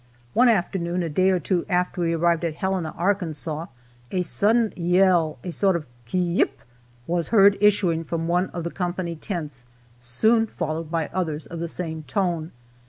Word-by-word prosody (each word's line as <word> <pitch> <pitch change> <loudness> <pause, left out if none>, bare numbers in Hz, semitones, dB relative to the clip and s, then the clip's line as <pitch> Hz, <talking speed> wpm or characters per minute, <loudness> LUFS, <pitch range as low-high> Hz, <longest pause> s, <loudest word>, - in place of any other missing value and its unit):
One 250 +1 +5
afternoon, 175 -4 0
a 165 - -2
day 185 +5 +2
or 185 -1 +2
two 175 +2 0
after 180 0 0
we 170 -1 +1
arrived 170 0 +1
at 165 -2 -2
Helena, 190 -3 -1
Arkansas, 165 -4 -1 0.4
a 185 - 0
sudden 220 +5 +2
yell, 175 -2 +3
a 180 - -4
sort 190 +1 +2
of 165 -3 -3 0.2
"ki 120 - -3
yip!" 175 -1 +1 0.4
was 170 -1 -1
heard 200 -2 +6
issuing 190 -6 +3
from 165 +1 -3
one 180 +2 +1
of 170 - -6
the 170 - -4
company 175 -2 -3
tents, 150 - -5 0.3
soon 220 - +2
followed 160 -4 -4
by 165 -2 -2
others 160 -5 -2
of 170 - -7
the 170 - -2
same 160 -2 -4
tone. 170 +2 -2
175 Hz, 170 wpm, -24 LUFS, 160-190 Hz, 0.4 s, heard